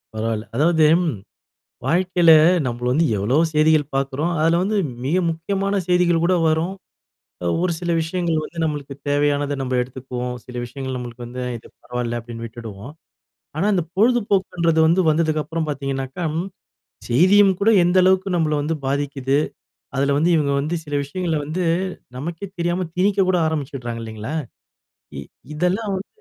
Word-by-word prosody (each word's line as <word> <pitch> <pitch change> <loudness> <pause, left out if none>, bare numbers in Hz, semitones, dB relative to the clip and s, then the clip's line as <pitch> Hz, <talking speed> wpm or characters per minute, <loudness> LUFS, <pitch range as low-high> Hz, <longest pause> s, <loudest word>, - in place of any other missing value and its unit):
பரவால்ல. 110 0 -2
அதாவது 160 +3 +4 1.0
வாழ்க்கையில, 175 +1 +3 0.4
நம்ம 120 0 -3
வந்து 160 +5 +3
எவ்வளோ 105 +8 0 0.2
செய்திகள் 155 0 +4
பார்க்குறோம். 135 +4 -1
அதில 165 +2 +3
வந்து 210 +3 0 0.3
மிக 150 +7 +1
முக்கியமான 195 +4 -1
செய்திகள் 175 -2 +3
கூட 185 +1 +3
வரும். 165 +4 0 0.7
அ - - -4 0.2
ஒரு 180 -2 +1
சில 175 0 -3
விஷயங்கள் 165 -1 -1
வந்து 170 - -10
நம்மளுக்கு 145 -3 -3
தேவையான 145 0 +2 0.2
நம்ம 130 -1 -1
எடுத்துக்குவோம். 125 -1 -5
சில 125 - -12
விஷயங்கள் 130 +1 -5
நம்மளுக்கு 120 -1 -7
வந்து 125 +1 -6
இது 115 - -13 0.2
பரவால்ல 120 -1 -3
அப்படின்னு 115 0 -8
விட்டுடுவோம். 115 +1 -9 0.7
ஆனா, 175 - +1
இந்த 180 - +1
பொழுதுபோக்குன்றது 195 -7 +2
வந்து, 175 +3 +4
வந்ததுக்கப்புறம் 155 0 0
பார்த்தீங்கனாக்கா, 135 +2 -3 0.9
செய்தியும் 190 +10 +5
கூட 215 - +4
எந்த 175 +2 +2
அளவுக்கு 190 +1 +3
நம்பள 155 -2 +1
வந்து 160 +2 -1
பாதிக்குது. 140 -1 0 0.6
அதில 140 +1 +2
வந்து, 165 +4 +2
இவங்க 145 -2 +1
வந்து, 155 +4 -2
சில 145 - -6
விஷயங்களை 165 +3 -2
வந்து, 165 +5 -2 0.5
நமக்கே 165 +7 -5
தெரியாம 175 +1 -1
திணிக்கக் 195 +1 +2
கூட 185 - +3
ஆரம்பிச்சிடுறாங்க 135 -6 -4
இல்லைங்களா. 110 +4 -6 0.8
இ - - -4 0.3
இதெல்லாம் 185 +6 0
வந்து 190 - -7
155 Hz, 140 wpm, -21 LUFS, 130-175 Hz, 1.0 s, செய்தியும்